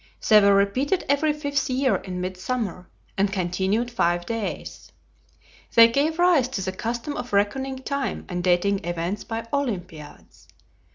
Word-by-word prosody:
They 215 -1 +7
were 200 0 +5
repeated 255 - +1
every 285 +2 +2
fifth 285 -2 -2
year 255 -5 +2
in 180 0 -6
mid 185 +1 -3
summer, 195 -3 -4 0.3
and 195 0 +2
continued 190 +5 -1
five 175 -6 0
days. 225 0 -5 0.8
They 230 0 +9
gave 295 +6 0
rise 345 -7 +4
to 255 -7 -4
the 190 - -2
custom 235 +8 -4
of 245 - -6
reckoning 265 +7 0
time 280 -1 -3
and 180 -1 -4
dating 185 +2 +2
events 175 +4 -3
by 225 0 -5
Olympiads. 180 - -5
215 Hz, 150 wpm, -24 LUFS, 185-265 Hz, 0.8 s, They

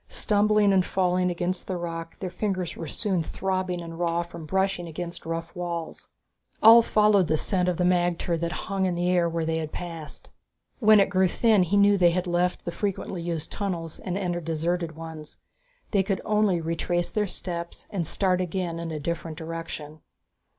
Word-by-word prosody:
Stumbling 210 -1 +3
and 190 -1 +4
falling 180 -1 +1
against 175 +1 -2
the 185 - -2
rock, 165 -1 -5
their 185 -2 -5
fingers 185 -4 -2
were 165 - -6
soon 190 +2 0
throbbing 185 +1 -2
and 165 0 -8
raw 170 0 +1
from 170 -2 -10
brushing 190 -1 0
against 170 +1 -6
the - - -9
rough 165 0 -4
walls. 170 -2 -5 0.5
Ulv 230 +1 +9
followed 210 -4 +4
the 155 - +2
scent 180 +2 +1
of 175 - -1
the 180 - +1
magter 175 -1 +1
that 170 +1 -2
hung 195 -1 0
in 180 - -1
the 175 +1 0
air 175 -2 +3
where 165 -1 -2
they 160 0 0
had 155 -1 -4
passed. 165 -3 -8 0.5
When 215 -3 +7
it 195 - +3
grew 190 -1 +4
thin 215 +2 +3
he 180 +3 +2
knew 200 0 +5
they 175 -1 +6
had 180 +2 -1
left 175 0 0
the 175 - -2
frequently 190 -1 -3
used 165 -2 -4
tunnels 170 -5 -4
and 185 -1 -3
entered 175 -4 -2
deserted 165 0 -1
ones. 160 -1 -9 0.5
They 200 - +3
could 190 -1 -1
only 210 -4 +2
retrace 165 +2 -1
their 210 -2 0
steps 170 -2 -6
and 175 -6 -2
start 185 0 +1
again 175 -2 -2
in 170 0 -4
a 155 -1 -4
different 165 +1 -4
direction. 160 -2 -6
175 Hz, 190 wpm, -26 LUFS, 165-190 Hz, 0.5 s, Ulv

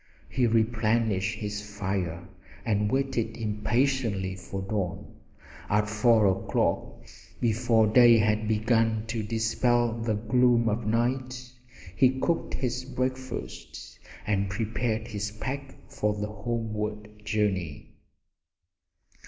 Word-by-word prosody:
He 125 -3 +2
replenished 110 -2 +1
his 105 -1 -4 0.2
fire 95 -3 -2 0.4
and 105 -2 +1
waited 130 -4 -1
impatiently 110 -2 0
for 95 +1 -6
dawn. 95 -3 -3 0.6
At 105 +1 +2
four 110 0 +4
o'clock, 95 0 0 0.4
before 115 -1 +3
day 120 +2 +7
had 110 0 +1
begun 110 0 +2
to 115 -1 -1
dispel 115 +2 +1
the 115 -1 -1
gloom 120 +2 +3
of 105 +1 -2
night, 125 +2 -1 0.5
he 130 +6 +3
cooked 170 +4 0
his 125 0 -2
breakfast 130 -1 -5 0.3
and 100 -1 0
prepared 110 +2 -2
his 105 -1 -3
pack 135 +6 -5
for 105 0 -1
the 105 0 -4
homeward 105 -1 -4
journey. 95 -8 -2
110 Hz, 105 wpm, -27 LUFS, 105-120 Hz, 0.6 s, day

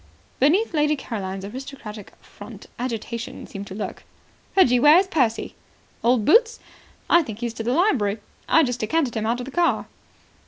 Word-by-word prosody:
Beneath 350 - +3
Lady 300 -1 +2
Caroline's 195 -7 -5
aristocratic 230 -3 -9
front - - -12
agitation 235 -1 -5
seemed 200 0 -8
to 190 - -8
lurk. 210 - -6 0.5
"Reggie, 250 -10 +5
where 295 +5 +7
is 380 - +4
Percy?" 255 -11 0 0.5
"Old 235 -3 +3
Boots? 455 +6 +4 0.5
I 345 - +5
think 220 -9 -7
he's 235 0 -4
gone - - -18
to 225 - -3
the 245 - +1
library. 255 - +2 0.3
I 325 - +5
just 245 -3 -2
decanted 255 +3 0
him 220 0 -1
out 235 +2 0
of 245 - -5
the 275 - -8
car." 345 +3 +1
245 Hz, 170 wpm, -23 LUFS, 220-305 Hz, 0.5 s, where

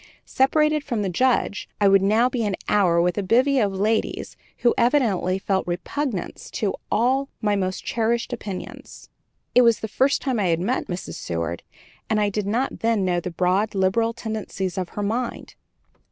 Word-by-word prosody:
Separated 305 +3 +2
from 235 -7 -2
the 195 - -1
Judge, 240 +1 0
I 205 - +4
would 195 0 +5
now 215 +5 +3
be 250 -2 -2
an 205 -2 0
hour 180 -5 +3
with 175 +2 +1
a - - +1
bevy 255 +7 +3
of 205 -4 +2
ladies 215 +3 -1 0.2
who 240 - +3
evidently 225 -8 +2
felt 195 -1 -1
repugnance 195 +5 -4
to 205 -3 0 0.2
all 265 +4 +2
my 210 -2 +1
most 185 -1 -2
cherished 235 +2 0
opinions. 205 -5 -8 0.4
It 250 - +7
was 230 -2 +4
the 220 - -3
first 265 +6 +2
time 260 -5 0
I 195 - +1
had 165 -1 +1
met 235 +9 -1
Mrs. 180 0 -5
Seward, 85 0 -3 0.5
and 215 - +2
I 205 -1 +2
did 205 0 -2
not 240 +6 -1
then 225 -4 +1
know 175 -1 +1
the 175 - -5
broad, 185 +5 0
liberal 195 +5 +2
tendencies 215 -5 -4
of 185 -2 -3
her 205 - -4
mind. 230 +4 -3
210 Hz, 180 wpm, -23 LUFS, 190-240 Hz, 0.5 s, It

